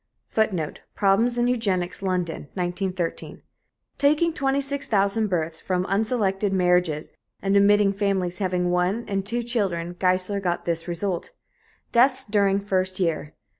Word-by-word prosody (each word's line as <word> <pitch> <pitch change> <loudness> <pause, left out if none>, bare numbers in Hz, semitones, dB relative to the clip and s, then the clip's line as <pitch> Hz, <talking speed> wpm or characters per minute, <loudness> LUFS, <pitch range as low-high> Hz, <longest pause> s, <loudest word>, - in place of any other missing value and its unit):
[Footnote: 190 -8 -1 0.2
Problems 220 +5 +2
in 240 0 +2
Eugenics, 195 -8 0
London, 180 -5 -2
1913.] 180 -1 -3 0.6
Taking 305 +4 +3
26,000 270 -8 +1
births 165 -3 -2
from 185 -1 -1
unselected 200 -1 0
marriages, 180 -4 +1 0.3
and 195 0 0
omitting 200 0 +4
families 195 -3 -1
having 180 -2 0
one 180 +6 0
and 195 -1 -1
two 235 +4 -2
children, 190 -8 -1
Geissler 185 +2 +2
got 175 -2 -2
this 170 0 -2
result: 175 +1 -2 0.6
Deaths 260 +2 +3
During 200 -2 +2
First 185 -2 -1
Year. 160 -4 -1
195 Hz, 125 wpm, -24 LUFS, 180-215 Hz, 0.6 s, omitting